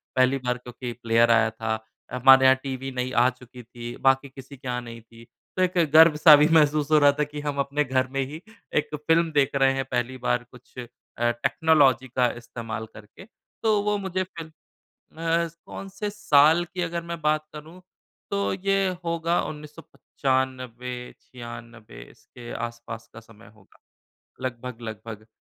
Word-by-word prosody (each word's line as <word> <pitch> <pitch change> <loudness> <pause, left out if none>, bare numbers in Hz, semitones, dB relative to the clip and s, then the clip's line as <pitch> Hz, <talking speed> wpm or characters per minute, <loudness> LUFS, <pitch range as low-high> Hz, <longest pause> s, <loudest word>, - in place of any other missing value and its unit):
पहली 130 +1 +3
बार 125 0 0
क्योंकि 125 0 -8
प्लेयर 115 +1 +4
आया 115 -1 +4
था। 110 0 -3 0.3
अ, - - -6
हमारे 130 +1 +7
यहाँ 130 0 +7
टीवी 135 0 -5
नई 125 0 -3
आ 125 +1 +4
चुकी 125 -1 -13
थी, 120 +1 -9
बाकी 135 +1 +2
किसी 135 +1 -12
के 130 0 -11
यहाँ 125 0 -2
नहीं 115 -1 -10
थी, 115 +1 -17 0.3
तो - - +1
एक 180 0 -1 0.2
गर्व-सा 155 -1 +8
भी 150 +1 +4
महसूस 150 -1 +3
हो 155 - +6
रहा 145 0 +6
था 150 - +3
कि 150 0 -7
हम 145 -1 -3
अपने 140 +2 0
घर 130 -1 0
में 135 +1 -2
ही 155 +5 -9 0.4
एक 150 - +1
फ़िल्म 165 +2 +1
देख 140 -1 +1
रहे 135 -1 +3
हैं 135 0 -2
पहली 125 +1 -2
बार, 125 -1 -1
कुछ 125 0 -18
अ, 125 - -6 0.5
टेक्नोलॉजी 135 +1 +2
का 125 0 +1
इस्तेमाल 115 -2 -7
करके। 105 - -14 0.4
तो 215 -2 +3
वो 210 0 0
मुझे 190 -1 -2
फिर 175 -3 -9
म 160 - -16 0.7
अ, 165 +1 0 0.2
कौन 195 - -8
से 205 +2 -5
साल 165 -4 +4
की 180 +1 -7
अगर 170 -1 -3
मैं 170 0 -6
बात 155 0 +1
करूँ, 160 +4 -11 0.5
तो 200 0 0
ये 195 0 +1 0.2
होगा 170 0 0
1995-96 125 - -6
इसके 120 -1 -13
आसपास 115 -1 -7
का 110 - -10
समय 115 0 -18
होगा, 100 -3 -24 0.6
लगभग-लगभग 115 -3 -7
130 Hz, 170 wpm, -25 LUFS, 120-155 Hz, 0.7 s, गर्व-सा